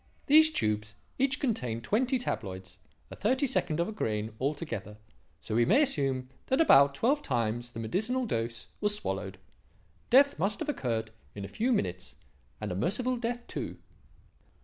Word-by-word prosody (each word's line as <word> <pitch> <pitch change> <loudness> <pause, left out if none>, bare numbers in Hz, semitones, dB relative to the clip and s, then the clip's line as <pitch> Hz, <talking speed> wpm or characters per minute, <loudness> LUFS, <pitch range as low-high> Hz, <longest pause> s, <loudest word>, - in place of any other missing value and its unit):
These 315 +2 +7
tubes 105 - -1 0.2
each 275 +2 +2
contained 125 - -2
twenty 250 - +1
tabloids, 95 - -5 0.3
a - - -7
thirty 260 +7 +1
second 180 - 0
of 170 - +1
a - - -4
grain 110 - -2
altogether, 130 - -3 0.4
so - - -5
we 120 +2 +4
may 270 - +5
assume 135 - 0 0.2
that 265 - +1
about 140 - +6
twelve 270 - +2
times 120 - -2
the 115 - -6
medicinal 220 - -1
dose 115 - -3
was 210 0 +1
swallowed. 210 - -4 0.7
Death 280 +3 +5
must 200 +4 0
have 315 - -3
occurred 115 - -2 0.2
in 100 -1 -5
a - - -6
few 235 - -1
minutes, 90 - -2 0.4
and - - -4
a - - -3
merciful 225 - 0
death 240 0 -3
too." - - -5
170 Hz, 160 wpm, -30 LUFS, -, 0.7 s, These